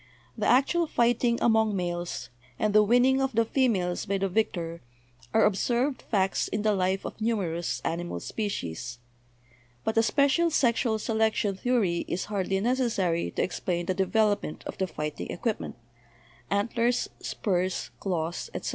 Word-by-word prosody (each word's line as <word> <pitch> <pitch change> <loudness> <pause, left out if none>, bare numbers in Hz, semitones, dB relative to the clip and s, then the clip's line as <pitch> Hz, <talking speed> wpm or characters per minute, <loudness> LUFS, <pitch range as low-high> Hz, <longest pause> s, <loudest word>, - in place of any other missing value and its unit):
The - - -1
actual 320 +7 +3
fighting 240 -2 +2
among 220 -2 +3
males, 175 -4 -3 0.3
and 215 -1 0
the 215 - +7
winning 245 +5 +4
of 270 -1 0
the 230 +1 +3
females 215 -8 0
by 200 0 +1
the 195 0 0
victor, 175 -4 -1 0.5
are 220 - +4
ob 205 - +3
served 250 +6 0
facts 195 -3 0
in 205 0 -2
the 215 -1 +3
life 190 0 0
of - - -7
numerous 185 -7 -1
animal 170 - -2
species. 125 - -4 0.9
But 220 - -1
a - - +7
special 280 +7 +3
sexual 235 -6 +2
selection 220 -2 0
theory 200 -6 +1
is 180 - -2
hardly 195 -1 0
necessary 220 -8 +1
to - - -1
explain 175 -1 -2
the 185 - 0
development 205 -2 +1
of - - -5
the 190 - +1
fighting 150 -3 -5
equipment 220 +4 -3 0.4
— - - -29 0.3
ant 200 +3 0
lers, 240 +1 +2
spurs, 180 - -1
claws, 170 -3 -2
etc. - - -3
205 Hz, 155 wpm, -27 LUFS, 180-235 Hz, 0.9 s, the